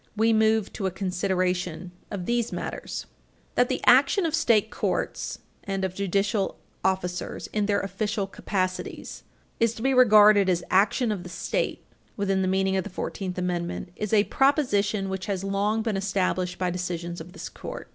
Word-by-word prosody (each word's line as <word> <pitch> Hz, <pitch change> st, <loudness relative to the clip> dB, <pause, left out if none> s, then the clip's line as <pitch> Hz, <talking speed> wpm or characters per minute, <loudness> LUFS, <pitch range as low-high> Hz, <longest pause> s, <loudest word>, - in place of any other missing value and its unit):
We 225 Hz, +1 st, +4 dB
move 220 Hz, -1 st, +2 dB
to 195 Hz, -, -2 dB
a -, -, +1 dB
consideration 185 Hz, -2 st, -1 dB, 0.2 s
of 190 Hz, -4 st, -4 dB
these 235 Hz, +1 st, 0 dB
matters. -, -, -5 dB
II -, -, -34 dB, 0.3 s
That -, -, +3 dB
the -, -, -2 dB
action 395 Hz, -4 st, +5 dB
of 320 Hz, -, -1 dB
state 230 Hz, -9 st, +3 dB
courts -, -, -2 dB, 0.3 s
and 195 Hz, -1 st, -1 dB
judicial 200 Hz, +1 st, 0 dB, 0.3 s
officers 185 Hz, -1 st, -1 dB
in 210 Hz, -1 st, +1 dB
their 200 Hz, -1 st, +2 dB
official 200 Hz, +1 st, -2 dB
capacities 185 Hz, -1 st, -3 dB, 0.4 s
is 230 Hz, -1 st, +2 dB
to 225 Hz, -, -7 dB
be 270 Hz, 0 st, +3 dB
regarded 210 Hz, -5 st, +7 dB
as 175 Hz, -1 st, +1 dB
action 210 Hz, +5 st, +3 dB
of 200 Hz, -4 st, -3 dB
the 180 Hz, -, -9 dB
State 175 Hz, -, -2 dB, 0.3 s
within 195 Hz, -2 st, +1 dB
the 185 Hz, -, +1 dB
meaning 190 Hz, 0 st, +1 dB
of 190 Hz, -, 0 dB
the -, -, -7 dB
Fourteenth 185 Hz, 0 st, -4 dB
Amendment 175 Hz, 0 st, -2 dB
is 210 Hz, -1 st, -4 dB
a 210 Hz, -2 st, +5 dB
proposition 215 Hz, -8 st, +2 dB
which 190 Hz, +1 st, -4 dB
has 195 Hz, -2 st, -2 dB
long 205 Hz, +3 st, 0 dB
been 220 Hz, -3 st, -1 dB
established 185 Hz, -2 st, -1 dB
by 180 Hz, -1 st, 0 dB
decisions 175 Hz, -1 st, -4 dB
of 175 Hz, +2 st, -11 dB
this -, -, -7 dB
Court. -, -, -8 dB
195 Hz, 170 wpm, -26 LUFS, 185-215 Hz, 0.4 s, regarded